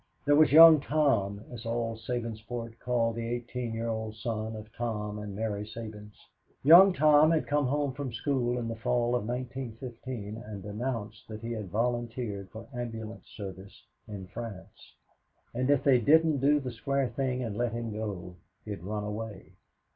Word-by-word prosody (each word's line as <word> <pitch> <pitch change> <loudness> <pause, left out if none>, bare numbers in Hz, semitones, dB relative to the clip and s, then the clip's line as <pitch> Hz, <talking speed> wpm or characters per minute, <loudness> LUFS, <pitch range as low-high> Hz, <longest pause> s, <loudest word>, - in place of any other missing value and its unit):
There 145 0 +5
was 155 +1 +6
Young 160 0 +10
Tom, 120 -10 +1
as 120 -2 -8
all 115 -1 -2
Sabinsport 115 0 -5
called 115 -2 0
the 115 0 -3
eighteen 120 0 -3
year 115 +1 -2
old 110 -1 -3
son 110 0 -3
of 110 +1 -10
Tom 105 -3 -3
and 105 -1 -6
Mary 105 -1 -2
Sabins. 105 -1 -9 0.4
Young 175 +7 +9
Tom 155 -2 +5
had 165 -2 +2
come 145 -2 +1
home 145 0 0
from 140 -2 -4
school 125 0 0
in 120 -2 -3
the 115 - -3
fall 120 +1 0
of 110 -3 -2
1915 120 -3 -5
and 100 -4 -8
announced 105 0 -4
that 110 -1 -8
he 115 0 -5
had 105 -5 -4
volunteered 115 -2 -2
for 110 +1 -10
ambulance 115 -2 -6
service 95 -1 -9 0.2
in 100 -3 -7
France, 100 0 -9 0.6
and 125 +2 0
that 145 - +6
if 140 - 0
they 135 -3 +5
didn't 155 +3 +4
do 145 +3 +4
the 130 -3 -5
square 135 +2 -1
thing 130 +1 -1
and 110 -4 -4
let 120 +1 0
him 115 -1 -4
go, 100 -5 -5 0.3
he'd 105 -4 -5
run 105 +3 -3
away. 105 -2 -6
115 Hz, 170 wpm, -29 LUFS, 110-125 Hz, 0.6 s, Young